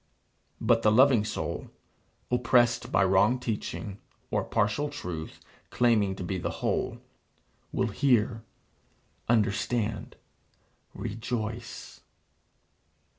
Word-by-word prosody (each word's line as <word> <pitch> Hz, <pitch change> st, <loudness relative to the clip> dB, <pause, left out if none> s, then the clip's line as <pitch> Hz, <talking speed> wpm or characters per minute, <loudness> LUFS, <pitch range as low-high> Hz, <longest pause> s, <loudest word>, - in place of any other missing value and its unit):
But 115 Hz, -1 st, +3 dB
the 105 Hz, -, +4 dB
loving 125 Hz, -1 st, +5 dB
soul, -, -, -4 dB, 0.6 s
oppressed 120 Hz, -1 st, +3 dB
by 95 Hz, -, +4 dB
wrong 95 Hz, +6 st, +4 dB
teaching, 105 Hz, -3 st, -4 dB, 0.3 s
or -, -, +1 dB
partial 125 Hz, +9 st, 0 dB
truth 80 Hz, -, -6 dB, 0.3 s
claiming 110 Hz, -5 st, +2 dB
to 95 Hz, -, -6 dB
be 95 Hz, +1 st, -2 dB
the -, -, -2 dB, 0.2 s
whole, -, -, 0 dB, 0.7 s
will 120 Hz, -, 0 dB
hear, 115 Hz, -1 st, +2 dB, 0.9 s
understand, 110 Hz, 0 st, 0 dB, 0.8 s
rejoice. 115 Hz, 0 st, -5 dB
110 Hz, 90 wpm, -28 LUFS, 105-120 Hz, 0.9 s, loving